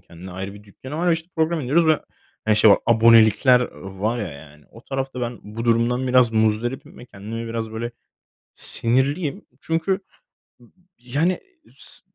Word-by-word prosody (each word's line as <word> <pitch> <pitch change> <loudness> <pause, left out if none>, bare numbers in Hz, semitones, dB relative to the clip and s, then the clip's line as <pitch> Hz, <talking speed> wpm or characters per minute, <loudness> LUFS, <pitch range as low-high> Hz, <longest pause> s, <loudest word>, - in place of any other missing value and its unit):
kendine 90 +2 -12
ayrı 95 +2 -6
bir 105 0 -14
dükkanı 130 +8 -10
var. 175 +2 0
Ve - - +4
işte 165 +1 -4
program 160 +1 0
indiriyoruz 150 +5 +2
ve, 155 -1 +3 0.4
hani, 110 -1 +2
şey 105 0 +6
var - - +6
abonelikler 115 +1 +5
var 95 +5 -4
ya, 105 -5 -3
yani 75 +1 -15
o 115 +3 -16
tarafta 135 -2 -4
ben 120 -1 -4
bu 110 +3 -7
durumdan 120 +2 +1
biraz 125 -2 +4
muzdaribim 110 +3 -1
ve 120 - -11
kendime 115 +2 -7
biraz 115 -1 -4
böyle 115 +2 -4 0.6
sinirliyim. 135 +6 +2 0.2
Çünkü 165 +4 -1 1.0
yani 145 +9 -1 0.4
s - - -9
115 Hz, 160 wpm, -22 LUFS, 110-135 Hz, 1.0 s, şey